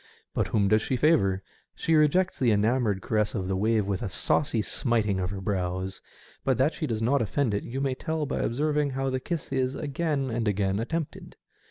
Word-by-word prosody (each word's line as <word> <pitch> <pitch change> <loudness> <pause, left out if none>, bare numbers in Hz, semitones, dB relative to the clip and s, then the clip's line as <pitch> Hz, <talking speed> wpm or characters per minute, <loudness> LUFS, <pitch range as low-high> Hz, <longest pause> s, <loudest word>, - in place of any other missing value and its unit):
But - - 0
whom 100 -2 +2
does 110 +2 +4
she 130 - -1
favour? 110 - +3 0.3
She 165 - 0
rejects 160 +5 +3
the 125 - +3
enamoured 105 -1 +2
caress 105 0 0
of 95 -4 -2
the 95 - 0
wave 110 +1 +2
with 100 -2 -2
a - - -2
saucy 115 +3 +1
smiting 110 -4 0
of 90 -1 -1
her 95 0 -5
bows, 95 -1 -2 0.4
but - - +2
that - - +2
she - - -3
does 110 -1 -2
not 135 +3 +3
offend 115 +1 0
it 100 - -1
you 130 +3 -4
may 135 -1 0
tell 160 +3 -2
by 145 - -2
observing 150 +3 +1
how 135 0 -2
the 130 - -1
kiss 165 +3 -4
is 130 0 0
again 145 -3 -1
and 115 -1 -1
again 100 -1 +1
attempted. 160 +7 -4
115 Hz, 205 wpm, -27 LUFS, 100-140 Hz, 0.4 s, does